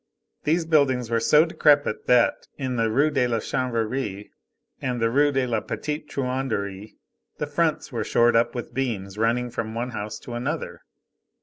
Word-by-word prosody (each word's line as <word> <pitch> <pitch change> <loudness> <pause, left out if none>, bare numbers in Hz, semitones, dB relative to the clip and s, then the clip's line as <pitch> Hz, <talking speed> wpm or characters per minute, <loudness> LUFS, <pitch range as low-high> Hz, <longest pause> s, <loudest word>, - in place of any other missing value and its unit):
These 165 +2 +2
buildings 130 -7 +2
were 115 - +3
so 150 +7 +5
decrepit 145 -7 +2
that, 125 -1 +3
in 130 -3 -2
the 115 -1 +1
Rue 140 +7 +2
de 130 -4 +2
la 115 -1 0
Chanvrerie 115 -3 -2 0.5
and 125 -2 -2
the 115 0 +1
Rue 145 +3 +4
de 135 -2 +1
la 115 -3 0
Petite 150 +8 -5
Truanderie, 125 -7 -3 0.4
the - - -2
fronts - - -1
were - - -2
shored 120 0 +3
up 115 +1 +2
with 120 0 -5
beams 105 -6 -3
running 120 +2 +1
from 115 -1 -4
one 120 +2 -3
house 105 -1 -5
to 120 - -8
another. 120 +1 -4
120 Hz, 170 wpm, -24 LUFS, 115-135 Hz, 0.5 s, so